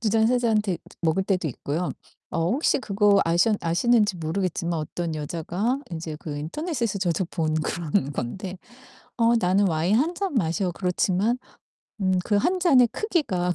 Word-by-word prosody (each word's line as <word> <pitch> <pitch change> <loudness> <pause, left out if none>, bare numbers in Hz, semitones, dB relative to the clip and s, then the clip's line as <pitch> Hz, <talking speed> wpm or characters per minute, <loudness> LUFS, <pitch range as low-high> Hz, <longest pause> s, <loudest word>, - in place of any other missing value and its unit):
2 225 - 0
잔, 220 +1 +3
3 250 +2 +3
잔 225 -3 +2
데 190 -5 -2 0.2
먹을때도 185 +2 +1
있고요. 150 +6 -3 0.4
어 165 +1 0
혹시 280 +6 +2
그거 205 -4 +3
아셔 175 +6 +3
아시는지 205 +4 +2
모르겠지만 170 +1 -2
어떤 160 +2 -3
여자가 175 - -2
인제 160 -2 -5
그 150 -3 -5
인터넷에서 235 - -2
저도 180 -1 0
본 155 -3 -1
그런 155 -1 -1
건데 185 - -5 0.6
"어 230 +1 +4
나는 195 0 +3
와인 170 +5 +2
1 315 +8 +1
잔 380 -4 -3
마셔." 180 -2 0
그렇지만 185 +6 0 0.6
음 185 -1 +2
그 205 - +1
1 365 - +1
잔의 270 -9 +5
크기가 195 - 0
190 Hz, 290 characters per minute, -25 LUFS, 165-225 Hz, 0.6 s, 잔의